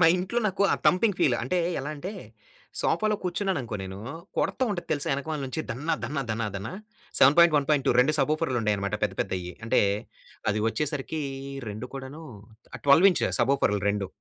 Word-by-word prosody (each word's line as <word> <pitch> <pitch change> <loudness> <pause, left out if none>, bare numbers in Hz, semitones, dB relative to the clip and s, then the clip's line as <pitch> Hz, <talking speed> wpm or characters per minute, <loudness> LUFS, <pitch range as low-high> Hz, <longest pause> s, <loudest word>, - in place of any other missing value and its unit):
మా 170 - +7
ఇంట్లో 185 +6 -1
నాకు 195 +1 -1
ఆ - - +4
థంపింగ్ 190 +1 +3
ఫీల్. 125 -4 +4
అంటే 155 +10 0 0.2
ఎలా 140 +2 -4
అంటే, 180 +8 -5 0.7
సోఫాలో 215 -1 +1
కూర్చున్నాననుకో 175 - -2
నేను 95 0 -7 0.4
కొడతా - - 0
ఉంటది 175 -3 -4
తెలుసా? 145 -2 -2
వెనకామల 145 +2 -3
నుంచి 130 +4 -3
దన్న, 140 +8 -5 0.2
దన్న, 140 +4 -3
దన్న, 115 +1 -1
దన్న 100 +2 -4 0.5
7.1.2 150 -1 +5
2 135 +5 +3
సబోఫెర్లు 155 -1 +1
ఉండాయన్నమాట 105 -2 0
పెద్ద 105 -3 0
పెద్దయి. 90 -1 -3
అంటే 115 - +3 0.7
అది 105 - 0
వచ్చేసరికి 150 +4 -2 0.5
రెండు 105 +4 -5
కూడాను 135 +4 -7 0.6
12 145 +7 +7
ఇంచ్ - - 0 0.2
సబోఫెర్లు 120 -5 +2
2. 100 -1 0
140 Hz, 150 wpm, -27 LUFS, 115-165 Hz, 0.7 s, మా